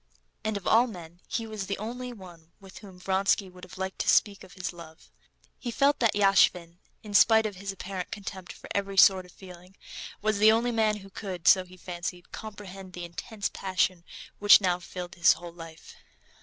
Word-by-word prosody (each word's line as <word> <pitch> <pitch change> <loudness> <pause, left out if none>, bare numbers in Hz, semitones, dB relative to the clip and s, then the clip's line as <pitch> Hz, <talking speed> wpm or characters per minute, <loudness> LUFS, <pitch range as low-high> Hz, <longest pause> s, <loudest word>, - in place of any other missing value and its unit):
And 215 -1 -1
of 200 - -10
all 235 +3 +4
men 175 -5 -11
he 230 - -3
was 215 -3 -6
the 200 - -2
only 245 +4 -6
one 175 -6 -14
with 195 -1 -13
whom 195 -4 -13
Vronsky 190 +1 +1
would 180 0 -16
have 185 0 -11
liked 190 0 -5
to - - 0
speak 200 -2 +3
of - - -14
his 185 -1 -5
love. 165 -2 -14 0.5
He 250 - -5
felt 280 +5 +2
that 230 -4 +2
Yashvin, 180 -4 +3 0.2
in 210 -2 -9
spite 220 +2 +6
of 205 -3 -4
his 200 +1 -5
apparent 190 -1 -6
contempt 190 -3 -7
for - - -12
every 200 -1 -2
sort 190 -1 +6
of - - -18
feeling, 180 0 -14 0.4
was 215 0 0
the 215 +1 +7
only 235 +2 +1
man 220 -2 +1
who 195 - -15
could, 185 -4 -6
so 185 -1 +6
he 185 0 -16
fancied, 175 0 -7
comprehend 195 -3 -9
the 175 -1 -6
intense 200 +5 -5
passion 185 -2 -1 0.4
which 205 -1 +8
now 180 -3 0
filled 180 0 -8
his 185 +2 +5
whole 170 +1 -10
life. 165 -2 -12
190 Hz, 195 wpm, -27 LUFS, 180-210 Hz, 0.5 s, which